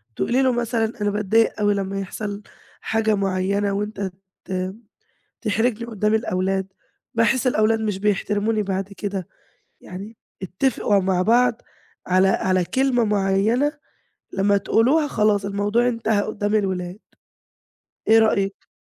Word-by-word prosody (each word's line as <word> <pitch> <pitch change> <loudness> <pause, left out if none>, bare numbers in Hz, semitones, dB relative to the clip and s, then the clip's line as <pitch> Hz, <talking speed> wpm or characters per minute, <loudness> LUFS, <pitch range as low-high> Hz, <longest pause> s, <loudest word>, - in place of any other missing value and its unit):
تقولي 240 - +1
له 260 -1 +3
مثلًا 235 -2 -1
أنا 205 - +2
باتضايق 210 +2 +1
أوي 205 0 +3
لمّا 195 0 -2
يحصل 200 +1 -5 0.4
حاجة 220 -1 +1
معيّنة 195 +1 0
وأنت 200 -1 -3 0.3
ت 185 0 -3 0.7
تحرجني 225 +1 0
قُدّام 215 -1 0
الأولاد، 190 -3 0 0.5
باحس 230 +2 +2
الأولاد 225 -2 +2
مش 210 -3 -2
بيحترموني 210 +1 0
بعد 195 0 -3
كده. 200 -3 -4 0.5
يعني 200 +5 -9 0.2
اتّفقوا 200 +2 +1
مع 185 -1 +1
بعض 235 +3 +3 0.5
على 185 +1 +4
على 185 -1 +1
كلمة 260 +2 +1
معيّنة 210 +6 +2 0.6
لمّا 200 +1 +2
تقولوها 265 +9 +2
خلاص 210 -4 +1
الموضوع 205 +4 +1
انتهى 225 -3 0
قُدّام 205 0 -2
الأولاد. 185 -2 -2 1.1
إيه 225 +1 +7
رأيِك؟ 200 -3 +1
205 Hz, 120 wpm, -22 LUFS, 195-225 Hz, 1.1 s, إيه